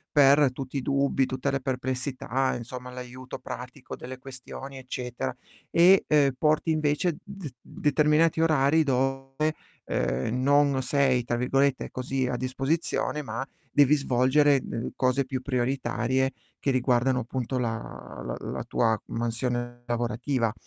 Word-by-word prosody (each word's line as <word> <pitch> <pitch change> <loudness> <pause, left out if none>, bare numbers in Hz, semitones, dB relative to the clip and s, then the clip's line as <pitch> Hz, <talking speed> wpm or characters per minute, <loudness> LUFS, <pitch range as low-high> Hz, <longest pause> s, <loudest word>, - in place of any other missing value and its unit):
per 140 -2 +6
tutti 135 +1 -5
i - - -1
dubbi, 140 0 +2
tutte 130 +2 -2
le 135 - 0
perplessità, 130 0 -1
insomma 125 +1 -7
l'aiuto 125 +1 -8
pratico 125 +1 -8
delle 130 +1 -8
questioni 135 +1 -9
eccetera, 125 - -4 0.3
e, 180 +3 +6
uhm, 145 -2 +5
porti 155 +1 +2
invece 155 +2 +1
d 195 -8 -8
determinati 150 +2 +2
orari 155 -1 +4
dove, 135 +2 0 0.3
uhm, 110 - -1
non 140 0 +4
sei, 130 -3 +2
tra 120 - 0
virgolette, 135 +2 +1
così 130 0 -1
"a 125 - -1
disposizione", 135 +4 -1
ma 135 0 -4 0.2
devi 145 +1 +5
svolgere 135 +1 +3
d 115 - -4
cose 130 +1 +1
più 130 0 -3
prioritarie 130 0 0 0.3
che 140 - +1
riguardano, 125 0 +2
appunto, 130 +1 -3
la 115 -2 0 0.5
la - - -4
la - - -4
tua 115 -2 +1
mansione 120 +1 -2
lavorativa. 120 0 -1
130 Hz, 130 wpm, -27 LUFS, 125-140 Hz, 0.5 s, per